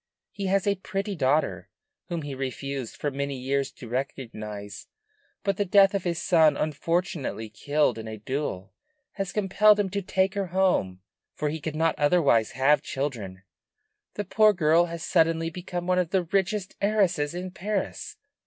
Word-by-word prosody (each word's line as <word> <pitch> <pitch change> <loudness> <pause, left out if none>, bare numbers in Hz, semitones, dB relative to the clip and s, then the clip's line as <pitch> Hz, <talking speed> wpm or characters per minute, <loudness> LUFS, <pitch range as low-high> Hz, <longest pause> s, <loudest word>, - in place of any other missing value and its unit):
He 200 -1 -4
has 195 0 +2
a 200 - +3
pretty 195 +2 -3
daughter, 150 0 0 0.4
whom 170 -4 -3
he 145 -1 -5
refused 135 -1 -4
for 145 - -2
many 140 0 -3
years 135 +2 -1
to 120 - -11
recognize; 110 -5 -5 0.6
but 195 -1 0
the 205 - +2
death 195 +1 +5
of 195 -2 -2
his 170 -2 -1
son, 160 -4 +4
unfortunately 155 -6 -2
killed 145 +4 +1
in 110 - -7
a 110 0 -6
duel, 110 -4 -4 0.4
has 195 -3 -4
compelled 210 +1 +4
him 195 -2 0
to 200 +1 -1
take 190 +1 +1
her 200 -2 -2
home, 175 - +1 0.3
for 150 - -1
he 155 +1 -4
could 155 0 -4
not 160 0 +2
otherwise 145 -8 +3
have 135 +2 +3
children. 115 -11 -4 0.7
The 205 - -3
poor 215 +3 +4
girl 165 -1 +4
has 170 -1 -6
suddenly 165 -1 +2
become 175 0 -5
one 180 0 +2
of 180 -3 0
the 190 0 +1
richest 190 +2 -1
heiresses 190 -7 +1
in 180 +1 -5
Paris. 195 +2 -3
165 Hz, 165 wpm, -26 LUFS, 135-190 Hz, 0.7 s, death